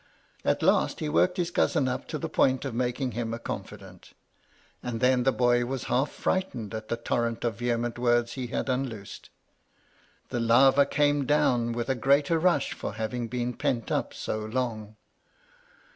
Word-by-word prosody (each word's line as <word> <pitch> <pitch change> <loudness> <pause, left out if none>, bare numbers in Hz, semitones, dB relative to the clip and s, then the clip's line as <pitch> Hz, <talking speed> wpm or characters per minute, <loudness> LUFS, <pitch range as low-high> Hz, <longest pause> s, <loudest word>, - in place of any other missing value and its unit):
At - - +1
last - - +2
he 155 - -2
worked 180 +4 +2
his 175 -1 -1
cousin 135 - +2
up 125 - -3
to 155 - -3
the - - -3
point 130 +1 +2
of 135 - -3
making 125 +2 -1
him 115 0 -3
a - - -6
confidant; - - -8 0.7
and 120 -2 -4
then 125 0 +3
the 135 +2 +3
boy 120 -1 +2
was 130 +1 -3
half 135 +4 +1
frightened 125 - -2
at 110 0 -5
the 115 - -2
torrent 115 0 -1
of 115 -1 -2
vehement 120 0 -1
words 120 -1 +2
he 130 -1 -4
had - - -3
unloosed. 125 -6 -4 1.0
The 120 - -2
lava 135 +4 +5
came 145 -1 +1
down 125 -6 +2
with 120 0 -3
a 135 - +2
greater 140 +6 +2
rush 180 +2 +2
for - - -5
having 115 +2 -3
been 125 +1 -2
pent 115 -1 -2
up - - 0
so 110 - -4
long. 110 -1 -3
125 Hz, 175 wpm, -27 LUFS, 115-135 Hz, 1.0 s, lava